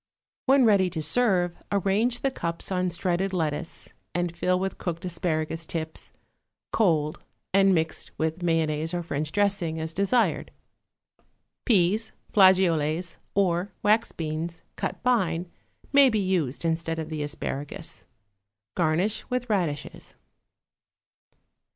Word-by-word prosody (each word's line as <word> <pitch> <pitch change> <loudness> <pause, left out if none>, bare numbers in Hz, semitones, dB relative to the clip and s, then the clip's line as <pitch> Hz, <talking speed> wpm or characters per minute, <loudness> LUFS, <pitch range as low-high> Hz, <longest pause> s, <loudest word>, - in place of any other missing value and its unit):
When 270 -1 +6
ready 200 -4 +4
to 165 -2 -4
serve, 180 -2 +2
arrange 205 +5 +1
the 275 - +2
cups 170 -5 -4
on 185 -1 +1
shredded 180 +2 -1
lettuce 160 -1 -3 0.3
and 175 -1 -1
fill 180 +1 +1
with 190 +1 -3
cooked 170 0 -4
asparagus 165 -2 -2
tips, 160 -1 -5 0.6
cold 155 -8 +2 0.3
and 195 0 +5
mixed 160 -1 -1
with 160 +2 -1
mayonnaise 160 -1 0
or 175 - -2
French 155 -1 -3
dressing, 195 -5 0
as 160 0 -3
desired. 200 +7 +1 1.2
Peas, 210 +1 +2 0.2
flageolets 180 -4 +4 0.2
or 185 0 +1
wax 215 +3 +3
beans, 165 +1 -4
cut - - -3
fine, 180 -8 +1 0.4
may 280 -1 +7
be 220 - 0
used 180 -8 0
instead 165 0 -1
of 160 -1 -4
the 155 -2 -4
asparagus. 145 +2 -4 0.7
Garnish 175 +6 0
with 250 -2 -2
radishes. 155 -8 -2
175 Hz, 120 wpm, -26 LUFS, 160-195 Hz, 1.2 s, may